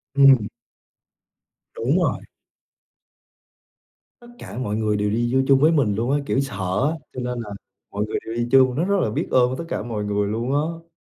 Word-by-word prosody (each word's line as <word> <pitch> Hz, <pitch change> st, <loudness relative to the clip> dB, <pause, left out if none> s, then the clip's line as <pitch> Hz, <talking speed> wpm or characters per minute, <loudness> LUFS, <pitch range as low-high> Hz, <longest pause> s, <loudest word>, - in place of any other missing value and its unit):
Ừm. 135 Hz, -6 st, +6 dB, 1.3 s
Đúng 135 Hz, +9 st, +1 dB
rồi! 175 Hz, -, 0 dB, 2.0 s
Tất 240 Hz, -, -15 dB
cả -, -, -9 dB
mọi 125 Hz, -5 st, -2 dB
người 105 Hz, -1 st, 0 dB
đều 105 Hz, 0 st, 0 dB
đi 120 Hz, +3 st, -1 dB
vô 130 Hz, -, +4 dB
chung 135 Hz, -1 st, +5 dB
với 155 Hz, +4 st, +5 dB
mình 135 Hz, -11 st, +2 dB
luôn 115 Hz, +5 st, -1 dB
á, 145 Hz, -, +3 dB
kiểu, 135 Hz, -, 0 dB
sợ 100 Hz, -2 st, -1 dB
á, 165 Hz, -, -4 dB, 0.2 s
cho -, -, -6 dB
nên 125 Hz, 0 st, -3 dB
là 110 Hz, -, -8 dB, 0.4 s
mọi 105 Hz, +1 st, -2 dB
người 110 Hz, -, -3 dB
đều 115 Hz, -, -5 dB
đi 120 Hz, 0 st, -1 dB
chung, 130 Hz, -2 st, +5 dB
rất 155 Hz, -, 0 dB
rất 200 Hz, +2 st, +1 dB
là -, -, 0 dB
biết 105 Hz, -, -2 dB
ơn 125 Hz, -1 st, +4 dB
với 130 Hz, -, -4 dB
tất 170 Hz, -, -5 dB
cả -, -, -3 dB
mọi 110 Hz, -3 st, -4 dB
người 105 Hz, 0 st, -1 dB
luôn 115 Hz, +5 st, -2 dB
á. 165 Hz, +3 st, -2 dB
125 Hz, 205 wpm, -22 LUFS, 105-140 Hz, 2.0 s, Ừm